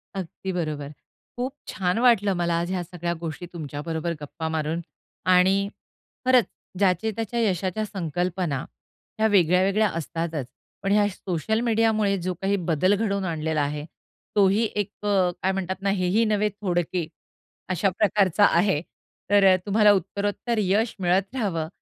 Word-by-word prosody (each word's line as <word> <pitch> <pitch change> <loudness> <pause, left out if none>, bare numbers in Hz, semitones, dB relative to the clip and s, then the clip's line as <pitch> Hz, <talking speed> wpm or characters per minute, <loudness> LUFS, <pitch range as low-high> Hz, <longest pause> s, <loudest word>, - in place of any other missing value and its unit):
अगदी 190 0 -5
बरोबर. 155 -5 -3 0.5
खूप 255 +2 -2 0.2
छान 185 +3 0
वाटलं 205 -5 +4
मला 170 -1 +1
आज 175 +2 -2
ह्या 185 -2 -1
सगळ्या 175 0 -4
गोष्टी 165 +1 -5
तुमच्याबरोबर 160 +1 -4
गप्पा 160 +2 -5
मारून 160 +2 -1 0.5
आणि 185 +2 +5 0.7
खरंच 255 -2 +5 0.3
ज्याचे 195 +2 +2
त्याच्या 225 +2 -3
यशाच्या 195 -1 0
संकल्पना, 175 -4 -2 0.6
ह्या 220 - +4
वेगळ्या-वेगळ्या 195 +2 +3
असतातच. 165 -3 -3 0.4
पण 195 - 0
ह्या 205 0 +4
सोशल 190 +3 -2
मीडियामुळे 220 -3 +2
जो 185 - 0
काही 195 +1 +1 0.2
बदल 185 +6 +3
घडवून 200 -2 -1
आणलेला 160 -2 -1
आहे, 145 +1 -2 0.5
तोही 200 +2 +4
एक 205 -1 -1 0.2
अ, 190 -3 +3
काय 190 - +3
म्हणतात 190 -1 -2
ना, 200 - 0
हेही 195 +3 +2
नव्हे 210 -1 +1
थोडके 180 -4 -2 0.6
अशा 185 +2 +2
प्रकारचा 205 -2 +4
आहे. 175 -4 +2 0.5
तर 195 -2 +6
तुम्हाला 210 0 +5
उत्तरोत्तर 205 +5 -2
यश 210 +3 +1
मिळत 190 +4 +1
राहावं, 190 -11 -1
190 Hz, 140 wpm, -25 LUFS, 170-205 Hz, 0.7 s, तर